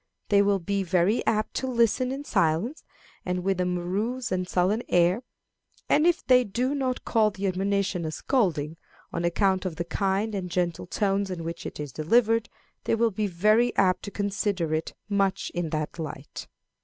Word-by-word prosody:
They 200 -1 +5
will 200 0 +3
be 200 +2 -1
very 185 +4 +2
apt 215 -1 +1
to 260 - -2
listen 250 +1 +2
in 275 +2 -4
silence, 190 - 0 0.4
and 180 0 -2
with 190 -1 0
a 180 - +1
morose 195 +8 -2
and 185 -1 -1
sullen 190 +5 +2
air; 175 +5 +3 0.7
and 305 +3 +4
if 345 -1 +1
they 250 -1 +6
do 245 +6 -1
not 260 -3 -2
call 220 -2 +3
the 200 -1 -5
admonition 195 -1 0
a 155 - -2
scolding, 165 - 0 0.4
on 170 - -2
account 190 +2 +2
of 185 -4 -3
the 170 +1 -3
kind 195 +5 -1
and 190 -3 -3
gentle 175 -1 -1
tones 195 +1 0
in 175 -3 -4
which 165 +1 -5
it - - -9
is 145 -2 -5
delivered, 225 - +2 0.4
they - - +2
will 230 0 +2
be 210 +1 -1
very 215 +7 +3
apt 185 -2 +3
to - - -4
consider 200 -5 -1
it 155 +1 -2
much 195 -2 0
in 175 -2 -2
that 155 +2 -3
light. 150 -3 -7
195 Hz, 180 wpm, -26 LUFS, 175-220 Hz, 0.7 s, they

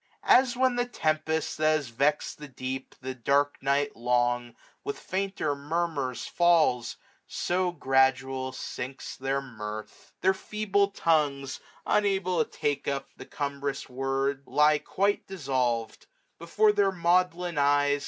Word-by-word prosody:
As 250 -1 +4
when 255 -1 +2
the 245 0 +1
tempest^ 160 -6 -1
that 155 0 +3
has 145 -5 -3
vex'd 140 +7 0
the 150 - -8
deep 130 0 -6
550 130 - -13
The - - -34
dark 145 +2 +2
night 140 +1 +1
long, 120 0 0 0.3
with 420 +1 -4
fainter 190 -6 -2
murmurs 145 -3 -2
falls: 165 -9 +2 0.3
So 180 0 0
gfftdual 130 -3 +1
sinks 130 +1 -6
their 135 +1 -1
mirth. 110 -4 -8
Their 190 - +4
feeble 200 0 0
tongues. 145 -8 0 0.3
Unable 195 -3 +2
to - - -16
take 145 -1 -2
up 140 -1 -2
the - - -11
cumbrous 140 -1 -3
word. 135 +1 -1
Lie 150 0 +4
quite 200 +5 0
dissolved. 130 - -2 0.3
Before 210 +6 +3
their 200 -2 +2
maudlin 175 -2 +1
eyes. 145 0 +3
145 Hz, 135 wpm, -28 LUFS, 135-180 Hz, 0.3 s, As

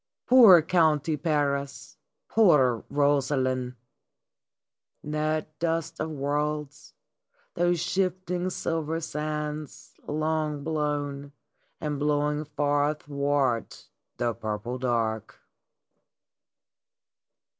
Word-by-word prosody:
Poor 220 -10 +8
County 160 -2 +2
Paris! 145 -3 -2 0.3
Poor 135 - +4
Rosaline!" 135 -3 +1 1.3
That 155 0 -2
dust 165 -1 -2
of 155 - -2
worlds, 150 0 -3 0.6
those 175 0 +1
shifting, 185 0 -1
silver 165 -2 -2
sands 150 -1 -5
long 155 -1 -1
blown 145 -2 -2 0.5
and 150 -2 -3
blowing 150 +1 0
far 145 0 +1
athwart 140 -5 -2 0.3
the 120 -1 0
purple 110 +4 -4
dark 115 -3 -2
150 Hz, 75 wpm, -27 LUFS, 140-155 Hz, 1.3 s, Poor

